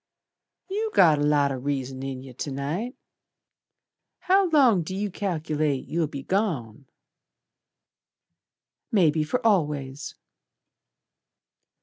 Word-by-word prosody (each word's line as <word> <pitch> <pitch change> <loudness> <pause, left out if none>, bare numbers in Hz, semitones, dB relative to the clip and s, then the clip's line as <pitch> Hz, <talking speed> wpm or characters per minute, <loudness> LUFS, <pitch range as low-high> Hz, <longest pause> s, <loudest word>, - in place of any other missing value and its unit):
"You 425 +4 -2
got 160 -5 +6
a - - +1
lot 145 -1 +3
o' 135 - -3
reason 135 -1 -3
in 135 -1 -5
yer 130 -2 -11
To 140 +3 -5
night. 160 - -3 1.3
How 380 0 +3
long 260 - +5
d' 160 - -7
you 200 +1 -2
cal'late 155 -7 -2
You'll 165 -1 0
be 140 -1 -7
gone?" 140 - -2 2.0
"Maybe 160 -7 +3
for 230 +11 -2
always." 145 -8 0
155 Hz, 105 wpm, -25 LUFS, 140-200 Hz, 2.0 s, got